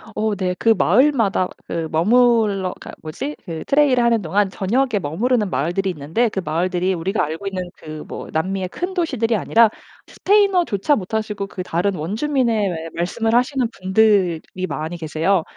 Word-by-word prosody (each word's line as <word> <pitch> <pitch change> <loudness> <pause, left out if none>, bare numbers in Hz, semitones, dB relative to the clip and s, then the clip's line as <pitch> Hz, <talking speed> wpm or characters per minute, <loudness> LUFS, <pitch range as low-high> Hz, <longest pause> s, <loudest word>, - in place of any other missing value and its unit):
어 215 0 0
네, 180 -2 -1
그 230 - +1
마을마다 225 - +3 0.2
그 165 -1 -3
머물러 210 0 +3
그니까 - - -10
뭐지 270 - -5
그 165 -4 -5
트레일을 275 -4 +3
하는 230 -2 +3
동안 195 +4 +1
저녁에 225 +5 0
머무르는 210 - 0
마을들이 175 +6 -1
있는데 165 +10 0
그 195 - -3
마을들이 180 +4 0
우리가 185 +4 -1
알고 160 +6 -4
있는 185 -2 -4
그 155 0 -9
뭐 - - -7
남미의 185 +3 -2
큰 360 - -4
도시들이 260 - 0
아니라 225 +1 +4 0.4
스페인어조차 360 - +2
못하시고 210 0 -3
그 185 -2 -6
다른 180 +3 -1
원주민의 220 - 0
예 165 -2 -5
말씀을 225 +7 0
하시는 255 0 +2
분들이 190 -4 +2 0.3
많이 155 +2 -4
계세요. 165 +3 0
200 Hz, 370 characters per minute, -20 LUFS, 175-235 Hz, 0.4 s, 아니라